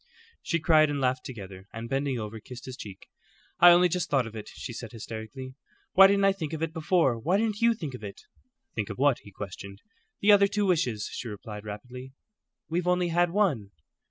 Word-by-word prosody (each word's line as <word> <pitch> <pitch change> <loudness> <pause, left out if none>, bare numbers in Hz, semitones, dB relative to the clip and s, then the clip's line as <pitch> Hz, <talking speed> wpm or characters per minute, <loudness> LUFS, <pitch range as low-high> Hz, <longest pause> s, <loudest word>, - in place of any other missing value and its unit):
She 170 - -1
cried 155 -1 +5
and 145 -1 -2
laughed 130 -1 0
together, 95 -6 -9
and 115 +1 -6
bending 135 0 -1
over, 110 0 -6
kissed 120 +3 -11
his 130 - -7
cheek. 100 -6 -10 0.5
"I 175 - +9
only 175 +1 +7
just 180 0 -2
thought 135 -4 +2
of 115 0 -9
it," 110 - -7
she 120 - -7
said, 115 -1 -8
hysterically. 115 +4 -7 0.4
"Why 195 +1 +9
didn't 200 0 +3
I 195 - +6
think 165 -6 -5
of 160 0 -3
it 165 -1 -2
before? 160 -6 +2
Why 175 - +1
didn't 215 -1 -1
you 230 0 +4
think 155 - -6
of 125 - -9
it?" 100 -1 -8 0.5
"Think 105 -3 -3
of - - -6
what?" 135 -1 +3
he - - -14
questioned. 100 0 -8 0.4
"The 210 - +5
other 200 -1 +6
two 205 +1 0
wishes," 125 - 0
she 125 - -5
replied, 105 0 -8
rapidly. 125 +5 -8 0.5
"We've 175 +2 -2
only 180 -1 +2
had 175 +1 +2
one." 165 - 0
135 Hz, 210 wpm, -28 LUFS, 110-175 Hz, 0.5 s, I